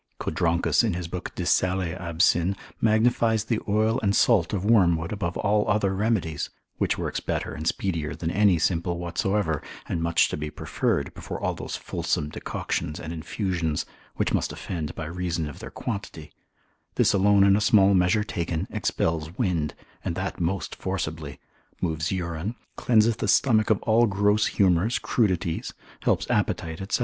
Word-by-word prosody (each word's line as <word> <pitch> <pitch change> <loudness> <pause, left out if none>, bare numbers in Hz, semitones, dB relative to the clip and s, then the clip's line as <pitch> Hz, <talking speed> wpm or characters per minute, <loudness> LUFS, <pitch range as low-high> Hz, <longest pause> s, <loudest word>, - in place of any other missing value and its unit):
Codronchus 85 +6 +1
in 110 -6 0
his 90 -1 -4
book 90 +1 -5
de - - -3
sale 90 -2 +1
absyn. 85 +1 +2 0.3
magnifies 110 0 +3
the 110 0 -1
oil 110 +3 +2
and 100 -2 +1
salt 100 -8 +4
of 100 -2 -2
wormwood 85 -7 +3
above 95 -5 -3
all 105 +1 +1
other 105 -2 +2
remedies, 95 -7 -1 0.3
which - - +1
works - - -2
better - - -3
and 80 +2 -5
speedier 85 -5 -1
than 80 0 -3
any 100 -2 +4
simple 85 +1 0
whatsoever, 85 0 -1 0.3
and 85 - -2
much 85 0 +3
to - - -3
be 75 0 -4
preferred 75 - -1
before - - -6
all - - -1
those - - -5
fulsome 75 -1 -2
decoctions 75 +1 -3
and 80 +1 -6
infusions, 85 -1 -2 0.3
which - - 0
must - - 0
offend 80 -5 -5
by 80 - -5
reason 85 -1 -2
of 75 - -9
their - - -7
quantity; 100 -8 -6 0.6
this - - +3
alone 100 0 +5
in 100 0 +6
a 105 - +1
small 100 -1 +5
measure 95 +3 +3
taken, 85 -3 -3
expels 80 -1 -1
wind, 85 - 0 0.3
and 85 - -2
that 95 +1 -4
most 90 +3 -1
forcibly, 80 -6 -4 0.4
moves 80 -1 -1
urine, 90 +3 -3 0.2
cleanseth 115 -1 +3
the - - -2
stomach 110 -6 +3
of 110 - +3
all 115 +1 +4
gross 105 +1 +2
humours, 95 +4 +2
crudities, 90 -7 -1 0.2
helps - - +1
appetite, 85 +6 -1
&c. - - +2
95 Hz, 160 wpm, -25 LUFS, 85-105 Hz, 0.6 s, in